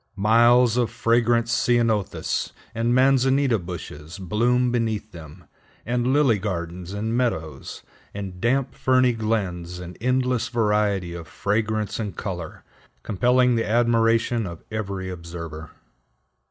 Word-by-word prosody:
Miles 120 +3 +4
of 120 -2 +2
fragrant 115 0 +2
ceanothus 115 -3 0 0.2
and 115 +2 +1
manzanita 130 -1 +3
bushes 85 -3 -8
bloom 120 +6 +1
beneath 110 -3 -1
them, 80 0 -12 0.4
and 120 +1 0
lily 135 -7 +3
gardens 90 -2 -4
and 110 +3 -2
meadows, 100 -12 -3 0.3
and 95 -3 -7
damp, 130 +2 +1
ferny 130 -2 +3
glens 95 -6 -2
in 90 0 -8
endless 125 -1 +1
variety 105 -6 0
of 85 -2 -8
fragrance 110 +2 -1
and 105 -3 -4
color, 90 -5 -6 0.4
compelling 125 +4 +3
the 115 -2 0
admiration 115 -1 +2
of 85 -2 -9
every 100 -3 -4
observer. 85 -3 -7
110 Hz, 115 wpm, -23 LUFS, 90-120 Hz, 0.4 s, Miles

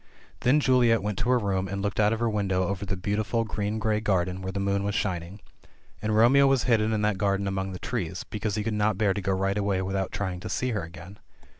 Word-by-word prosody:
Then 130 +9 +3
Juliet 125 -5 +3
went 105 -2 -2
to 120 - -1
her 125 - +5
room, 95 -4 -1
and 100 +1 -4
looked 100 +1 -2
out 105 0 +4
of 115 - -1
her 120 - +2
window 95 -4 0
over 100 +1 -3
the 95 +1 -2
beautiful 105 +4 -1
green 105 0 -3
grey 110 -1 0
garden, 95 -3 0
where 95 0 -4
the 100 - -3
moon 100 0 0
was 100 0 -2
shining. 95 -1 -3 0.6
And 110 0 0
Romeo 130 +5 +6
was 135 -3 +3
hidden 110 -3 +2
in 105 -1 0
that 105 -3 +1
garden 100 0 +1
among 95 0 -2
the 90 - -5
trees 90 -5 -4
— - - -42
because 105 -1 -2
he 105 - -1
could 115 - -2
not 105 -1 +1
bear 100 -2 +2
to 100 - -3
go 95 - -1
right 95 +2 0
away 100 -2 0
without 95 0 -2
trying 95 -3 -3
to - - -7
see 125 0 -1
her 110 - -1
again. 85 +4 -10
100 Hz, 255 wpm, -27 LUFS, 95-110 Hz, 0.6 s, Romeo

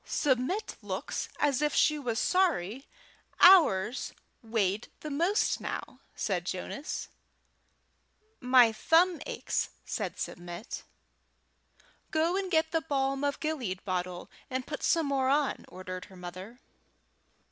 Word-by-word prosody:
"Submit 285 - 0
looks - - -4
as 290 -2 +2
if 300 0 +1
she 305 -1 +3
was 240 -5 -2
sorry 270 - +1 0.5
ours 255 - +6 0.3
weighed 220 -2 0
the 305 - -5
most 340 +9 +1
now," - - -5 0.2
said 185 -4 -1
Jonas. 275 +11 -4 1.3
"My 250 -2 +6
thumb 330 +9 +3
aches," - - -2 0.2
said - - -3
Submit. 175 +5 -6 1.3
"Go 325 +3 +1
and 385 -1 -1
get 320 -2 +2
the 325 - +1
balm 275 -2 -1
of 285 0 0
Gilead 250 - -3
bottle, 180 -2 -3 0.2
and 260 0 -2
put 300 - -5
some 330 -2 +2
more 270 -2 +1
on," 285 0 +1
ordered 185 0 -7
her 190 -2 -15
mother. 185 +7 -9
265 Hz, 120 wpm, -30 LUFS, 195-315 Hz, 1.3 s, ours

